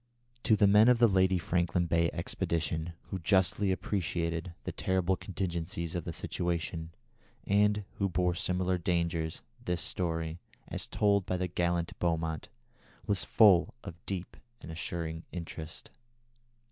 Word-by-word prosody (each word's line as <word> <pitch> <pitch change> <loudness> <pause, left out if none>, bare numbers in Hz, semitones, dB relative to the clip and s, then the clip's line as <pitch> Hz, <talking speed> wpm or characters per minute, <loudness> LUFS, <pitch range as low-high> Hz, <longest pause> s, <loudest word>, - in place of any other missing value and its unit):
To 110 - +5
the 105 - +4
men 105 +3 +7
of 125 -1 +6
the 120 0 +6
Lady 95 -2 +3
Franklin 85 0 +1
Bay 85 0 +2
Expedition, 80 +1 -2 0.2
who 95 - -2
justly 95 +2 +2
appreciated 85 -3 -2
the - - -3
terrible 95 0 +1
contingencies 85 -3 -3
of 85 -3 -3
the 85 - -3
situation, 85 -1 -2 0.6
and 105 0 +3 0.2
who 100 -1 +2
bore 90 0 +1
similar 90 +1 0
dangers, 85 -2 -1 0.2
this 90 -7 -1
story, 80 -2 -2 0.3
as - - -4
told 100 -2 +2
by 90 - 0
the 90 0 -1
gallant 85 -1 0
Beaumont, 80 -3 -1 0.6
was 100 -3 +2
full 100 -6 +5
of 85 0 -9
deep 95 -2 -4 0.2
and - - -9
assuring 80 0 -4
interest." 80 -2 -7
85 Hz, 135 wpm, -31 LUFS, 85-95 Hz, 0.6 s, men